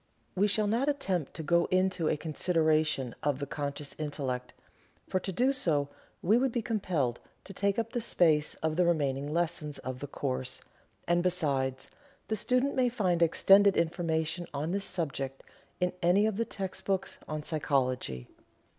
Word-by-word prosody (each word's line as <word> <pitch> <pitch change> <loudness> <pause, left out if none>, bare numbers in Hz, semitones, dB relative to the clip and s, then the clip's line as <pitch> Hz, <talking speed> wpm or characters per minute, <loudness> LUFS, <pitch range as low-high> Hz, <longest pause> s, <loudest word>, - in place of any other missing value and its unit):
We 200 +2 +3
shall 210 +1 +2
not 235 +7 +1
attempt 190 - -1
to 160 - -5
go 170 +3 +3
into 185 -3 +1
a - - +1
consideration 155 -4 +1
of 145 -3 +1
the 140 - -3
conscious 145 0 -4
Intellect, 135 -4 -3 0.6
for 185 - 0
to 190 - -4
do 250 +9 +2
so 150 - +1 0.3
we 215 +6 +4
would 265 0 +1
be 235 -1 -1
compelled 175 - -1 0.2
to 195 - -10
take 200 +1 0
up 230 0 -1
the 240 - -1
space 160 -8 +3
of 160 0 0
the 180 - +4
remaining 145 -3 0
lessons 160 -3 -1
of 130 0 -6
the 145 - -5
course, 130 -2 -3 0.5
and 175 0 +3
besides, 140 -7 -1 0.4
the 220 - +1
student 250 +6 +1
may 255 -1 +2
find 185 -8 0
extended 195 +4 +5
information 165 0 0
on 150 +4 -2
this 200 +1 -1
subject 140 -6 -2 0.4
in 180 0 +1
any 180 +5 +4
of 215 -2 0
the 230 - +1
text 190 -3 -5
books 195 -1 -1
on 155 -1 -4
psychology. 130 - -1
170 Hz, 165 wpm, -30 LUFS, 145-195 Hz, 0.6 s, extended